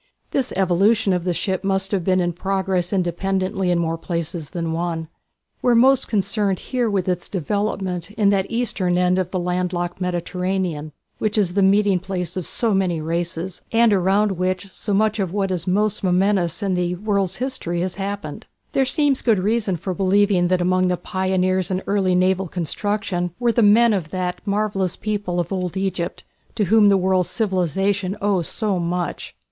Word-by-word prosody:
This 265 -2 0
evolution 195 +3 +3
of 180 -1 -1
the 180 - +1
ship 185 +2 -2
must 195 0 0
have 195 -4 0
been 185 +1 +2
in 175 -1 0
progress 190 -1 -1
independently 190 +1 -1
in 175 - +2
more 165 -1 -1
places 170 -2 -4
than 170 -3 -3
one. 165 -1 -3 0.5
We 245 - +3
are - - +4
most 265 +3 +5
concerned 200 -2 0 0.3
with 190 -3 -1
its 180 -1 -2
development 190 -1 -2
in 210 -1 +1
that 195 -1 +1
eastern 205 -7 0
end 180 +1 +2
of 185 -2 -1
the 185 - -3
land 180 0 -1
locked 175 +1 -3
Mediterranean, 180 -3 -2 0.3
which 215 0 0
is 190 -4 +2
the 200 - +2
meeting 195 0 +4
place 180 -2 -4
of 185 -3 -3
so 230 -3 +1
many 185 -4 +1
races, 170 +2 -3
and 230 -1 +4
around 195 0 +2
which 185 +1 -1
so 205 - -5
much 215 +2 +2
of 190 -4 -1
what 195 -2 0
is 175 -2 -3
most 205 +3 +1
momentous 185 0 +1
in 195 -2 0
the 180 0 0
world's 200 -1 -1
history 245 -10 -2
has 185 +1 -3
happened. 195 -6 -5 0.2
There 270 - +2
seems 285 -1 +2
good 225 -4 +3
reason 205 -1 0
for 185 +3 -4
believing 195 -1 +2
that 180 0 +1
among 185 +1 +2
the 180 0 0
pioneers 185 0 0
in 185 0 -2
early 195 -2 +1
naval 185 +1 +2
construction 180 +1 -2
were 240 -1 +2
the 235 - +2
men 220 +2 +5
of 175 -6 -2
that 180 0 -3
marvellous 200 -3 0
people 205 -4 -2
of 175 +2 -2
old 180 -1 -3
Egypt 190 -3 -3 0.3
to 215 - +1
whom 210 +1 +5
the 195 - +5
world's 185 -1 +1
civilization 195 - 0
owes 195 -5 0
so 205 -5 -1
much. 175 +1 -3
190 Hz, 180 wpm, -21 LUFS, 180-205 Hz, 0.5 s, most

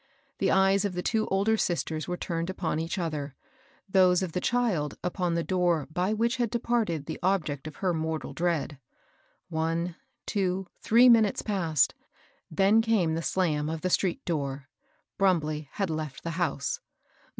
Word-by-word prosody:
The - - +2
eyes 195 +1 +4
of 200 -2 -1
the 180 - -2
two 220 -1 0
older 200 +3 +2
sisters 160 -5 -1
were 180 0 -2
tamed 170 0 -3
upon 180 -4 -2
each 165 +4 -3
other, 150 -5 -3 0.5
those 185 -1 +4
of 180 - -3
the 180 - -2
child 210 - 0
upon 180 -1 -1
the 170 - 0
door 175 -5 +1
by 180 +4 0
which 235 +3 +1
had 240 -2 0
de 235 - 0
parted 220 -11 -1
the - - -5
object 155 -7 0
oi - - -5
her 185 -3 +1
mortal 160 -1 -3
dread. 160 -5 -1 0.7
One, 165 +1 -1 0.3
two, 190 -2 -1 0.2
three 235 +3 +6
minutes 225 -4 +4
passed; 170 -8 +1 0.6
then 195 +7 +4
came 215 -8 +2
the 165 - -1
slam 155 -4 0
of 160 0 -4
the 185 - -1
street 185 -1 0
door. 140 -5 -3 0.5
Brumbley 155 -6 +1
had 195 -5 -1
left 155 -3 -5
the 165 - -3
house.. 165 -5 -1
175 Hz, 165 wpm, -28 LUFS, 160-195 Hz, 0.7 s, three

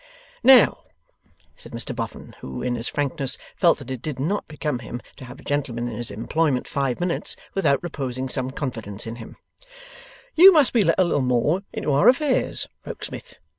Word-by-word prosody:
'Now,' 260 -4 +6 0.7
said - - -14
Mr - - -5
Boffin, - - -6
who, 65 -1 -7
in 125 -1 -1
his 115 0 -3
frankness, 145 -1 -2 0.2
felt - - +4
that - - -9
it 130 -3 -5
did 150 -4 -5
not 175 +10 -2
become 150 -4 -3
him 120 +1 -7 0.2
to 130 - -10
have 125 - -11
a - - -14
gentleman 130 -5 -2
in 120 - -5
his 120 0 -3
employment 125 +6 -1
five 135 -3 -2
minutes, 175 -1 0 0.2
without 155 -6 +1
reposing 130 -6 -4
some 130 0 -2
confidence 115 -7 -5
in 115 +1 -6
him, 115 - -11 1.0
'you 370 +4 +9
must 305 -7 +4
be 235 - +4
let - - +2
a 185 - +5
little 170 -5 +1
more 130 +8 +1
into 150 - -2
our 170 - +6
affairs, 260 +1 +2 0.2
Rokesmith. - - -8
140 Hz, 180 wpm, -23 LUFS, 125-170 Hz, 1.0 s, you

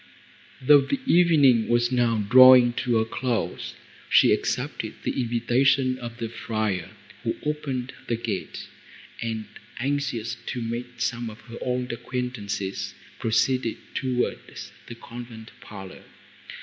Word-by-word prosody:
Though 145 +2 +6
the 210 - -1
evening 150 - +5
was 120 +1 +2
now 115 -4 +1
drawing 130 0 +8
to 120 -1 0
a 110 - +2
close, 120 +1 -3 0.3
she - - +6
accepted - - -2
the - - -1
invitation 130 +2 +2
of 120 -1 -7
the 115 -2 -3
friar, 110 -5 -3 0.3
who - - -2
opened 135 -4 -3
the 120 - 0
gate, 110 -5 -5 0.5
and, 110 -2 -3 0.3
anxious 135 -3 -2
to 125 - -3
meet 120 +1 -5
some 120 -1 -2
of 110 - -12
her 115 -1 -10
old 125 0 -2
acquaintances, 115 -5 -4 0.2
proceeded 115 +1 +1 0.2
towards 125 -2 -3 0.2
the 115 - -8
convent 115 -1 -10
parlour. 95 -3 -10
120 Hz, 125 wpm, -25 LUFS, 115-130 Hz, 0.5 s, drawing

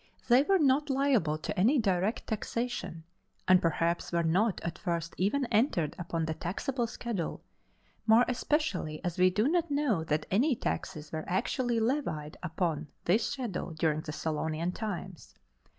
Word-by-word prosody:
They 245 +2 +7
were 385 +7 +3
not 290 -1 +3
liable 265 - +2
to 155 - -4
any 230 +11 +4
direct 200 -1 +1
taxation, 225 -6 -3 0.4
and 185 -1 +6
perhaps 165 +1 0
were 170 -1 +1
not 185 +6 +2
at 170 +1 -5
first 170 -3 -2
even 230 +9 +1
entered 210 - +2
upon 165 -2 -2
the 160 - -2
taxable 235 - -2
schedule, 230 -6 -4 0.6
more 225 +2 +6
especially 250 - -1
as 175 0 -2
we 185 0 +6
do 210 +6 +1
not 340 +1 +1
know 280 - +1
that 150 0 0
any 250 +8 +3
taxes 155 -8 -4
were 155 -1 -3
actually 235 +6 0
levied 220 - -1
upon 165 -3 -2 0.2
this 210 +6 +3
schedule 240 -11 -4
during 155 -1 +1
the 155 - -6
Solonian 160 +2 -2
times. 190 -5 -6
190 Hz, 150 wpm, -30 LUFS, 165-245 Hz, 0.6 s, They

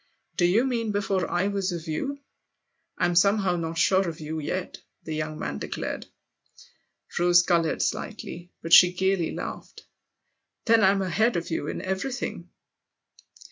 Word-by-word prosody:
" 225 -6 -49
Do 175 - +3
you 205 +7 +3
mean 235 -4 -1
before 200 -2 -1
I 180 +3 +1
was 195 -2 -1
of 170 -1 -6
you? 280 - -3 0.8
I'm 175 - +1
somehow 195 +1 +3
not 165 -1 -4
sure 190 +1 +3
of 160 - -8
you 160 +1 -4
yet! 180 +5 -4
" - - -51
the 160 - -5
young 155 0 -3
man 70 - -4
declared. - - -5 1.1
Rose 175 0 +5
coloured 170 -2 +1
slightly; 180 -5 -5
but 165 - -1
she 180 0 +9
gaily 190 -2 0
laughed. - - -7 0.4
" - - -53
Then 230 -2 +5
I'm 195 0 +4
ahead 220 +6 +1
of 170 0 -3
you 155 -2 -2
in - - -4
everything 195 +8 -4
180 Hz, 160 wpm, -26 LUFS, 165-200 Hz, 1.1 s, she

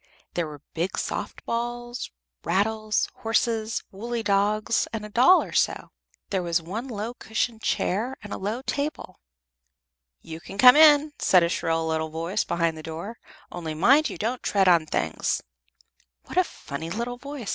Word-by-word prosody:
There 170 -2 -1
were 150 -2 -11
big 175 +3 -2
soft - - -4
balls, 240 +1 -3 0.3
rattles, 215 +3 0
horses, 225 0 0
woolly 230 +4 -4
dogs, 210 +2 +1
and 220 -2 -4
a - - -8
doll 255 - +6
or - - -9
so; - - 0 0.4
there 190 -2 +1
was 170 -1 +1
one 200 +10 -5
low 225 -1 -4
cushioned 225 -1 -3
chair 230 +9 -1
and 210 - -7
a - - -5
low 215 +6 -3
table. 290 +2 -4 1.0
"You 160 0 -9
can 195 - -10
come 250 +4 +9
in," 300 -1 +6
said 180 -2 +5
a 170 - +1
shrill 165 -1 0
little 160 0 -1
voice 165 +6 -2
behind 170 -2 -1
the - - -7
door, 165 +9 -7 0.3
"only 160 -3 -5
mind 275 - +4
you - - -7
don't 235 +4 -2
tread 195 -2 +2
on 170 -3 +5
things." - - -1 0.8
"What - - -9
a 370 - +6
funny 160 - -7
little 235 +6 -3
voice!" 275 -5 -7
215 Hz, 165 wpm, -25 LUFS, 170-240 Hz, 1.0 s, come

